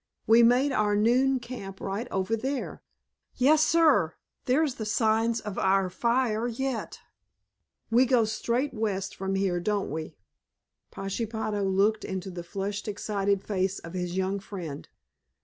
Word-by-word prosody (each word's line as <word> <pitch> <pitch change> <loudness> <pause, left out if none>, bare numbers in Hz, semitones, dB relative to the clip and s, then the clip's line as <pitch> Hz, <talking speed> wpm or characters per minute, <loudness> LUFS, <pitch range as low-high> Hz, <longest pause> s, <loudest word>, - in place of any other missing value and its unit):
We 225 +2 +6
made 250 +4 +4
our 210 -4 +2
noon 255 +5 +3
camp 235 -6 -8
right 200 +5 -3
over 190 +4 0
there! 265 +4 -4 0.5
Yes, 300 +4 +4
sir, 295 - +4 0.3
there's 280 +2 +2
the - - 0
signs 225 +2 +1
of 210 -2 -5
our 190 -1 +2
fire 235 +2 +1
yet! 245 0 -3 0.9
We 250 +3 +5
go 245 -3 +4
straight 235 +5 -1
west 200 -4 -2
from 195 0 -2
here, 190 -2 +1
don't 205 0 -1
we?" 155 +1 -5 0.7
Pashepaho 210 +1 -3
looked 195 +3 +2
into 190 0 -4
the 175 -1 -6
flushed, 200 +4 -4
excited 200 -1 -1
face 190 -1 -1
of 165 - -9
his 180 0 -3
young 190 +1 0
friend. 175 -8 -7
210 Hz, 140 wpm, -27 LUFS, 195-240 Hz, 0.9 s, We